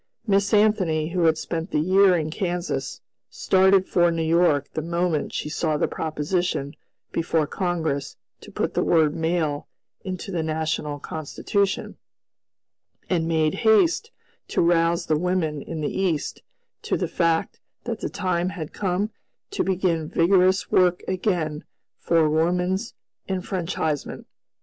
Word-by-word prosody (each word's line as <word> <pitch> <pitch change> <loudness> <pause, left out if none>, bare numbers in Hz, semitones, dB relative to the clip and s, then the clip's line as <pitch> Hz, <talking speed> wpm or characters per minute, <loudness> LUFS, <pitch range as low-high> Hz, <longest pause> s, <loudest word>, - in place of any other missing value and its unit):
Miss 200 -2 +2
Anthony, 190 -8 +2
who 175 -1 +1
had 160 -1 +4
spent 165 +2 -4
the - - -1
year 185 +3 +4
in 155 -1 -2
Kansas, 180 -1 -3 0.3
started 190 0 +3
for 175 -1 +3
New 165 -1 -1
York 160 -3 +3
the 155 - -2
moment 170 -1 -1
she - - -3
saw 155 0 -1
the - - +1
proposition 155 -1 -2 0.4
before 165 -2 0
Congress 160 -5 -2 0.2
to - - -13
put - - -2
the - - +1
word 155 -3 +3
"male" 160 -3 -1 0.4
into 185 +1 -5
the 175 -3 -1
national 155 -2 -2
Constitution, 175 +7 -2 1.1
and 165 -3 +1
made 160 -2 +2
haste 325 - +3 0.4
to - - +1
rouse 170 0 +2
the 155 -1 +1
women 170 -4 -1
in 160 +1 -6
the 150 - -2
East 175 -6 -1 0.4
to - - -1
the - - -1
fact 165 -1 0 0.2
that 230 -2 -4
the - - -3
time 185 -2 -1
had 175 -6 -7
come 195 +2 -1 0.4
to 405 - 0
begin 175 -4 0
vigorous 185 +2 +3
work 180 -1 +3
again 175 -5 -1 0.4
for 165 -2 +3
woman's 180 +7 0 0.3
enfranchisement. 180 -5 -3
170 Hz, 135 wpm, -24 LUFS, 160-185 Hz, 1.1 s, had